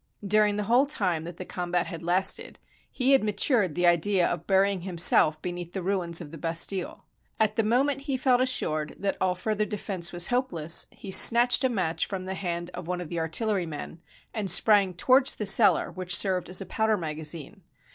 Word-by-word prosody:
During 210 +1 +2
the 210 - -2
whole 245 +7 +2
time 180 - -2
that 175 0 -9
the 185 - -7
combat 175 -1 -3
had 165 -3 -8
lasted, 180 +3 0 0.3
he 260 +1 0
had 270 -3 +4
matured 210 - +1
the 175 - 0
idea 175 +2 +2
of 175 -1 -4
burying 195 -1 +1
himself 170 -3 +3
beneath 175 -1 -6
the 190 - -5
ruins 175 -3 0
of 150 -4 -10
the 165 - -10
Bastille. 170 +3 -2 0.3
At 215 -1 +1
the - - +1
moment 265 +6 0
he 275 -2 -3
felt 255 -1 +1
assured 155 -12 -1
that 200 - -3
all 185 -1 0
further 210 +3 -2
defense 195 -4 -4
was 175 0 +1
hopeless, 175 -11 0
he 195 - -11
snatched 240 +6 +6
a 260 - +2
match 180 -8 -2
from 190 -2 -6
the 190 - -5
hand 175 -2 -5
of 180 -2 -8
one 180 0 -3
of 175 -3 -8
the 170 - -4
artillerymen, 165 -2 -4 0.3
and 210 -4 -3
sprang 195 0 +4
towards 255 +8 +2
the 210 - -5
cellar 205 +2 +3
which 185 -1 +2
served 185 -3 0
as 185 +2 0
a - - -6
powder 220 +1 -1
magazine. 155 -2 -6
185 Hz, 195 wpm, -26 LUFS, 170-215 Hz, 0.3 s, snatched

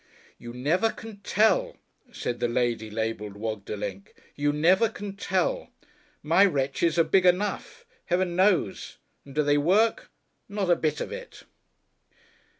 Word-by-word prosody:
"You 120 - -8
never 155 - +1
can 225 -1 -9
tell," 220 - +1 0.3
said 120 - -4
the - - +1
lady 120 -2 -1
labelled 105 -1 -3
"Wogdelenk;" 100 -2 -5 0.2
"you 145 0 +1
never 180 +9 +3
can 200 -1 -7
tell. 200 - -1 0.5
My 165 +6 +4
wretches 155 -1 +1
are 165 - +6
big 190 +2 +3
enough, 190 +3 0 0.2
Heaven 175 0 0
knows, 185 - +1 0.3
and 140 0 -13
do 150 - +2
they 145 0 +3
work? 200 +9 +2 0.4
Not 200 -3 -1
a - - +6
bit 155 -2 -1
of - - -4
it!"... - - -9
165 Hz, 140 wpm, -26 LUFS, 120-200 Hz, 0.5 s, are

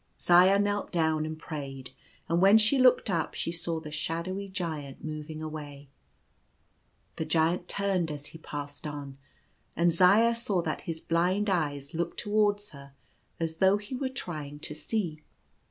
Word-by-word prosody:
Zaya 180 +3 +6
knelt 205 0 0
down 160 -2 +1
and 155 0 -5
prayed; 135 -5 -7 0.4
and 170 +1 +1
when 195 +3 +8
she 225 +5 +4
looked 255 -1 +5
up 165 -4 -1
she 165 - -2
saw 165 -1 -2
the 155 -1 -9
shadowy 170 +6 -3
Giant 160 -8 -5
moving 155 0 -6
away. 145 -3 -7 1.3
The 160 - -2
Giant 165 +3 +1
turned 195 -4 0
as 145 -1 -6
he 160 - -10
passed 145 -2 -6
on, 140 -2 -7 0.6
and 170 +1 +4
Zaya 200 +7 +5
saw 210 -7 0
that 155 - -3
his 160 -1 -3
blind 185 +5 +1
eyes 145 -4 -1
looked 170 +1 -2
towards 205 -1 +1
her 140 -2 -13 0.5
as 165 -1 -2
though 190 +2 +4
he 205 +4 -9
were 260 +1 -2
try 175 - -5
ing 145 +1 -10
to - - -4
see. 155 0 -3
165 Hz, 160 wpm, -29 LUFS, 150-195 Hz, 1.3 s, when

